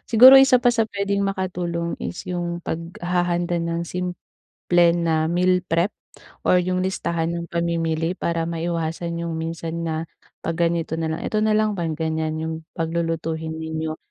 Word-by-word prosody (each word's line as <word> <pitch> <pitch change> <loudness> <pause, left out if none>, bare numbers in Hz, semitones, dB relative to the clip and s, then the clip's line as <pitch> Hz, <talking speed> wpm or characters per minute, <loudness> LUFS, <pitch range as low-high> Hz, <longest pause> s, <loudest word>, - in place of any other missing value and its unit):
Siguro 255 +4 +10
isa 265 -2 +6
pa 245 - +5
sa 225 -2 +1
pwedeng 200 -1 -1
makatulong 175 -3 -2
is 175 - -5
yung 175 -1 -3
paghahanda 175 +1 -1
ng 170 0 -2
simple 180 +1 -5 0.7
na 160 -1 +1
meal 180 +1 +2
prep 170 +2 +1 0.6
or 180 - +5
yung 185 +1 0
listahan 170 -3 -1
ng 170 0 -4
pamimili 165 -1 0
para 170 -2 -1
maiwasan 170 0 -3
yung 170 - -3
minsan 165 0 -4
na, 160 -1 -2 0.4
"‘Pag 165 +1 +1
ganito 165 -1 -2
na 160 - -1
lang, 160 - -3
ito 215 - 0
na 215 0 +3
lang" 215 0 +2
'pag 170 -5 -2
ganyan 160 -1 -1
yung 160 0 -2 0.2
paglulutuhin 165 -1 -2
ninyo. 160 0 -4
170 Hz, 155 wpm, -23 LUFS, 165-180 Hz, 0.7 s, Siguro